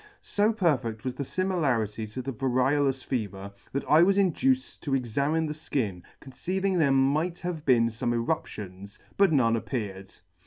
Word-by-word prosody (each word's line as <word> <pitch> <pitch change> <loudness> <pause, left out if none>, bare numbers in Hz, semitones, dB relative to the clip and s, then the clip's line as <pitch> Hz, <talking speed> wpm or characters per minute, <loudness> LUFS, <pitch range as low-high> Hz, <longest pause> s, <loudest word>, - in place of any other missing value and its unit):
So 210 +2 +2
perfect 130 - 0
was 130 - -2
the 140 - -4
fimilarity 130 - -1
to 130 +4 -5
the 135 +1 -4
variolous 135 +2 +1
fever, 100 -5 -4 0.2
that 140 - -2
I 155 +2 +6
was 195 +3 +4
induced 255 +8 +1
to 140 -3 0
examine 140 +6 0
the 150 - -3
Ikin, 115 - -3 0.2
conceiving 185 +8 -2
there 145 -4 +4
might 145 +6 +2
have 175 -3 -4
been 115 -3 +4
fome 120 +1 -2
eruptions, 105 - -4 0.2
but 200 -3 +4
none 115 -6 +3
appeared. 100 -5 -4
135 Hz, 155 wpm, -27 LUFS, 115-160 Hz, 0.2 s, I